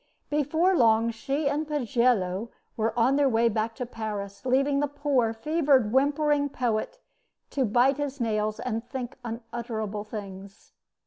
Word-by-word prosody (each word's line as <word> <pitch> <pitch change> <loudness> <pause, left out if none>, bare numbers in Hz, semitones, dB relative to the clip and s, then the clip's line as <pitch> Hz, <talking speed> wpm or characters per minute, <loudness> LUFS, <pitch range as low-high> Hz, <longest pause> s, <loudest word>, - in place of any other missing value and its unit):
Before 315 +6 +2
long 230 -4 +4
she 275 +6 -2
and 295 +2 -1
Pagello 235 -7 +1 0.3
were 225 +1 -1
on 255 +4 +3
their 285 -2 +4
way 230 0 +3
back 225 +1 -2
to 250 - -4
Paris, 205 -4 -6
leaving 275 +2 +2
the 290 - +1
poor, 285 -5 +1
fevered, 270 -1 +2
whimpering 285 +1 +2
poet 245 - -2 0.5
to 270 -2 +1
bite 245 +5 +3
his 285 -1 -3
nails 215 -2 -1
and 225 -2 -3
think 250 -2 -5
unutterable 225 -2 -5
things. 200 -2 -9
240 Hz, 140 wpm, -27 LUFS, 220-280 Hz, 0.5 s, long